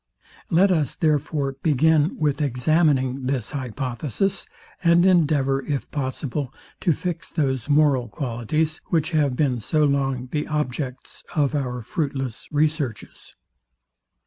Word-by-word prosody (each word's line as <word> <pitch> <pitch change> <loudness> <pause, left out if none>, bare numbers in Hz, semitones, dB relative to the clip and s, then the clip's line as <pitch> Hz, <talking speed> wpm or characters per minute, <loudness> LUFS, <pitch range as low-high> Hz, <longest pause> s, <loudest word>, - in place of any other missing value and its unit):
Let 185 +4 +4
us, 155 -7 +1
therefore, 145 -3 0
begin 155 +2 +3
with 150 -1 0
examining 135 -1 +1
this 130 -4 -1
hypothesis, 130 - -2 0.4
and 170 +1 +5
endeavour, 145 -7 +3
if 140 -1 -3
possible, 135 -1 -3 0.3
to 175 - +2
fix 165 +1 -3
those 135 -5 -1
moral 145 -4 +3
qualities, 135 +7 -2
which 165 0 0
have 145 -5 +2
been 130 -4 +1
so 150 +8 +1
long 135 -3 0
the 150 -1 -1
objects 135 -3 -4
of 145 -3 +2
our 125 -4 -2
fruitless 135 - -3
researches. 150 -6 -2
145 Hz, 120 wpm, -23 LUFS, 130-155 Hz, 0.4 s, and